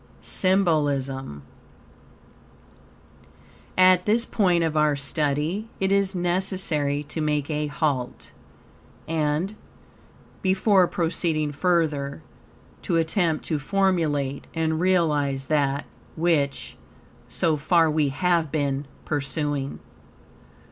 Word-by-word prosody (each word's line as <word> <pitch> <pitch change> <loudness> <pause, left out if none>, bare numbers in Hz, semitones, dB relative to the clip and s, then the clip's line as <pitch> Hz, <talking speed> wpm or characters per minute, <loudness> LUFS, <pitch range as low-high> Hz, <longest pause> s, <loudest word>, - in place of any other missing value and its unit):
SYMBOLISM 145 - 0 2.3
At 185 0 +5
this 230 +3 +4
point 180 -8 +2
of 160 -1 -1
our 150 -1 +3
study 150 +8 -1
it 190 0 0
is 200 -1 +2
necessary 175 -5 -1
to 150 +2 -5
make 150 -1 -1
a 150 0 -1
halt; 140 -4 -2 0.8
and, 160 +5 -1 0.9
before 190 0 +3
proceeding 165 -3 -1
further, 145 - 0 0.6
to 170 - 0
attempt 165 0 0
to 155 -3 -1
formulate 150 -6 0
and 160 -1 0
realize 150 -7 +1
that, 140 -1 0 0.3
which, 145 -6 0 0.5
so 160 -2 +1
far, 165 +3 +3
we 155 -2 +1
have 165 +1 0
been 140 -2 -1 0.2
pursuing. 145 -1 -2
155 Hz, 95 wpm, -24 LUFS, 145-180 Hz, 2.3 s, At